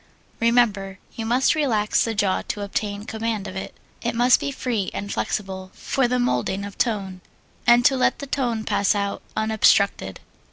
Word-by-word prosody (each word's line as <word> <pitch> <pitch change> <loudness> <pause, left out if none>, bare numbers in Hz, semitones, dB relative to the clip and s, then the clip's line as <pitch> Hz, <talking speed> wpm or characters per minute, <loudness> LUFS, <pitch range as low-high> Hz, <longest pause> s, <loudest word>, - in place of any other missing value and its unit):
Remember, 215 -5 +2 0.2
you 225 -1 -4
must 250 +3 +3
relax 230 -9 +1
the 225 -1 -2
jaw 200 -2 +1
to 205 - -3
obtain 205 0 -3
command 220 -2 -3
of 185 - -8
it. 190 - -6 0.3
It 235 0 -2
must 245 +2 +5
be - - -2
free 235 -7 -2
and 200 0 -4
flexible 190 -2 -3
for 265 -2 0
the 250 +1 0
moulding 200 - 0
of 200 - -8
tone, 195 -6 -1 0.5
and 240 0 +6
to 270 - +5
let 255 - +2
the 280 - -6
tone 245 -5 -1
pass 205 -2 +1
out 200 -1 -2 0.2
unobstructed. 200 - +2
215 Hz, 170 wpm, -23 LUFS, 200-240 Hz, 0.5 s, and